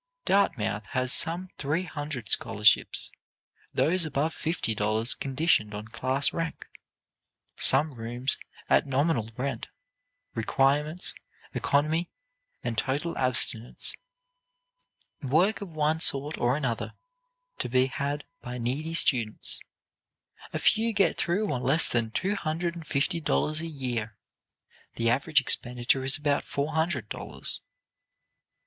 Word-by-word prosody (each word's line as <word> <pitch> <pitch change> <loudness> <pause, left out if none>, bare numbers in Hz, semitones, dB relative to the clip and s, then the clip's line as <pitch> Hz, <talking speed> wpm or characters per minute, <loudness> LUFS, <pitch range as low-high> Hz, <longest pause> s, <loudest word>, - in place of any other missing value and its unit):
Dartmouth 110 - +1
has 130 0 +1
some 175 +3 0
three 150 +5 -1
hundred 145 - -6
scholarships; 105 +2 +2 0.6
those 180 +3 +1
above 155 +1 -1
fifty 160 -8 -1
dollars 110 +3 +2
conditioned 135 -7 0
on 105 +1 -7
class 130 +4 0
rank; 165 -1 -4 0.9
some 155 -1 +5
rooms 120 +2 -1 0.3
at - - +3
nominal 135 -4 0
rent; 135 +2 -3 0.7
requirements, 150 +5 0 0.4
economy 155 +4 +1 0.5
and 115 -3 -1
total 140 +8 -2
abstinence; 125 -2 +2 1.3
work 160 +11 +2
of 190 -5 -8
one 155 +1 +1
sort 145 0 +3
or 125 +3 +1
another 135 -7 -3 0.6
to - - -1
be 130 +1 +3
had 140 +2 -3 0.2
by 125 0 -6
needy 140 +7 -2
students; 120 -9 +3 0.9
a - - -2
few 225 +1 +2
get 195 -4 +2
through 195 +5 0
on 125 - -2
less 135 +6 +4
than 115 -2 0
two 185 - -1
hundred 170 -2 -2
and 165 -3 -10
fifty 155 +6 0
dollars 155 0 +1
a 165 - -4
year; 120 -7 -4 0.8
the 115 0 +1
average 140 +4 +3
expenditure 125 0 +2
is 135 +2 +2
about 145 -1 0
four 145 +2 -3
hundred 160 - 0
dollars. - - -5
140 Hz, 120 wpm, -27 LUFS, 125-160 Hz, 1.3 s, some